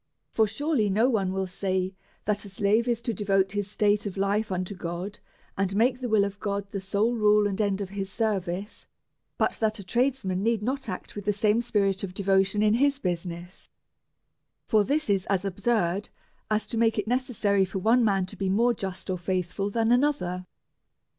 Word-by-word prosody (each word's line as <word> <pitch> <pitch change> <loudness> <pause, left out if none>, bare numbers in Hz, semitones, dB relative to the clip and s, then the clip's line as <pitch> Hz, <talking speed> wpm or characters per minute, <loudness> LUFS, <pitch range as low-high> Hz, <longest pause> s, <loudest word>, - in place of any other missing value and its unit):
For 220 -1 +3
surely 235 -1 0
no 215 +5 +3
one 195 -5 +1
will 190 0 -1
say 185 0 -2 0.3
that 205 0 0
a 200 - -9
slave 205 +4 +1
is 235 -1 0
to 235 - -1
devote 195 -2 +1
his 205 0 -2
state 205 0 +1
of 195 - -6
life 200 +2 0
unto 185 +1 -2
God, 180 +2 -5 0.4
and 195 0 -1
make 245 +4 +2
the 250 - -2
v\'ill 215 -3 +3
of 200 0 -6
God 200 -1 -2
the 200 - -3
sole 200 +5 0
rule 210 -2 +4
and 200 +1 -1
end 200 -1 0
of 195 - -4
his 195 -1 -4
service, 200 -3 -2 0.5
but - - +2
that 220 0 +1
a 200 - -7
tradesman 235 -3 0
need 225 0 +1
not 265 0 -2
act 185 - -6
with 205 -1 -6
the 210 - +3
same 210 +3 +2
spirit 200 -4 0
of 185 -2 -5
devotion 195 +1 +2
in 210 0 +4
his 280 +4 +3
business; 175 -4 -5 1.0
for 215 -1 +3
this 295 +7 0
is 195 -2 +1
as 195 -1 0
absurd 200 -1 0 0.4
as 215 0 +1
to 225 +1 -3
make 225 -1 +3
it 210 - -1
necessary 225 -5 +1
for 190 +1 -3
one 230 +6 +3
man 195 -4 +2
to 185 - -10
be 195 -1 -2
more 235 +5 +3
just 190 -3 -6
or 185 -1 -2
faithful 185 +2 -2
than 225 +2 +1
another. 245 -10 +1
205 Hz, 195 wpm, -27 LUFS, 190-225 Hz, 1.0 s, rule